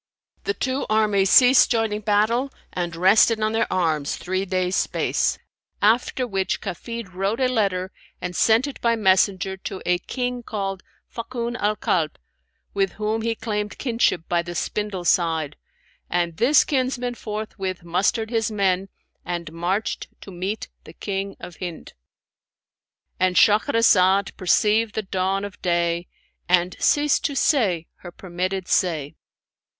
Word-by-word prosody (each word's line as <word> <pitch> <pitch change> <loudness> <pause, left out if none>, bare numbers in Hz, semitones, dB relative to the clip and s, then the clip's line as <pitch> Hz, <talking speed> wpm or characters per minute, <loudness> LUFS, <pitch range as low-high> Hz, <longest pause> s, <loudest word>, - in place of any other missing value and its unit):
The 420 - -1
two 260 +1 -2
armies 210 -3 +2
ceased 250 +4 +7
joining 225 -3 0
battle 220 +6 +1 0.2
and 175 -2 -3
rested 205 +6 +4
on 215 0 +1
their 225 +1 0
arms 155 -5 0
three 185 +1 -2
days' 185 0 -1
space, - - 0 0.4
after 235 +4 +2
which 195 -5 -1
Kafid 230 +1 -6
wrote 195 +5 -1
a 260 - +3
letter 195 -6 0 0.3
and 180 0 -5
sent 225 +3 +4
it 285 - -7
by 235 -1 +2
messenger 190 -2 +2
to 190 0 -6
a 180 0 +2
King 250 +4 -3
called 195 -4 -4 0.3
Fakun 235 0 -5
al 210 -3 0
Kalb 160 -7 -1 0.6
(with 195 -2 0
whom 215 +1 -2
he 230 0 -1
claimed 210 -2 -3
kinship 230 - 0
by 175 -1 +1
the 175 0 -7
spindle 205 -1 -3
side): 160 -4 +1 0.5
and 170 -2 -1
this 270 +4 +5
kinsman 255 -3 -1
forthwith 210 -5 -5
mustered 195 +6 0
his 225 -2 0
men 195 -2 0 0.3
and 170 -3 -5
marched 180 +6 -2
to 195 - -10
meet 190 +4 -4 0.2
the - - -13
King 195 -1 -4
of 175 - -10
Hind."—And 180 - -8
Shahrazad 205 -4 +4
perceived 210 +4 +2
the 220 - -1
dawn 190 +1 -1
of 205 - -10
day 170 0 0 0.4
and 180 0 +3
ceased 295 -1 +2
to 285 - -1
say 205 - +2
her 175 - -10
permitted 185 +1 -4
say. 155 -6 0
195 Hz, 140 wpm, -23 LUFS, 180-225 Hz, 0.6 s, ceased